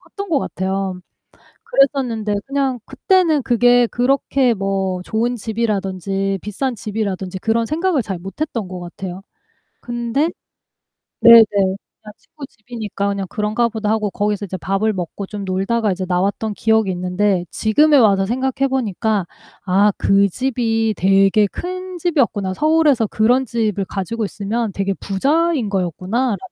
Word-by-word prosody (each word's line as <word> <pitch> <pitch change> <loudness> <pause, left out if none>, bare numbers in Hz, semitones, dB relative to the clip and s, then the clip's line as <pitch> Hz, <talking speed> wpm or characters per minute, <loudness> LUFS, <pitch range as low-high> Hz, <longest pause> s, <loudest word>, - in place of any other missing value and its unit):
컸던 400 -1 -8
것 305 - +3
같아요. 190 -2 -3 0.6
그랬었는데 245 -6 +1
그냥 270 -2 -1
그때는 350 -7 +2
그게 245 0 +4
그렇게 260 +1 +1
뭐 195 -2 -2
좋은 235 +5 -1
집이라든지 195 -3 -2
비싼 240 +5 -3
집이라든지 200 -3 -4
그런 230 +1 0
생각을 320 0 0
잘 190 -5 -5
못 195 - -10
했던 230 -11 -2
것 185 -1 -7
같아요. 180 +1 -7 0.6
근데 240 +6 -1 0.9
네네 230 -1 +10
그냥 200 +1 -3
친구 290 - -12
집이니까 215 -4 -5
그냥 200 -1 -2
'그런가 215 +3 0
보다.' 220 -2 -3
하고 215 -2 0
거기서 205 0 -1
이제 190 -1 -5
밥을 195 +4 0
먹고 185 +2 -5
좀 205 -1 -6
놀다가 200 +4 0
이제 185 0 -3
나왔던 200 +4 -1
기억이 220 -2 +2
있는데 180 +1 0
지금에 295 +8 +3
와서 200 -6 +4
생각해 260 +4 0
보니까 220 -5 -1 0.4
'아 200 +3 +3
그 200 0 +3
집이 225 -1 -1
되게 195 +2 +4
큰 365 - -6
집이었구나. 240 - 0
서울에서 300 - +3
그런 245 +6 +2
집을 215 -4 -1
가지고 205 +4 -3
있으면 215 +2 -3
되게 195 +1 -1
부자인 280 - 0
거였구나.'라는 195 - -1
215 Hz, 320 characters per minute, -19 LUFS, 195-245 Hz, 0.9 s, 네네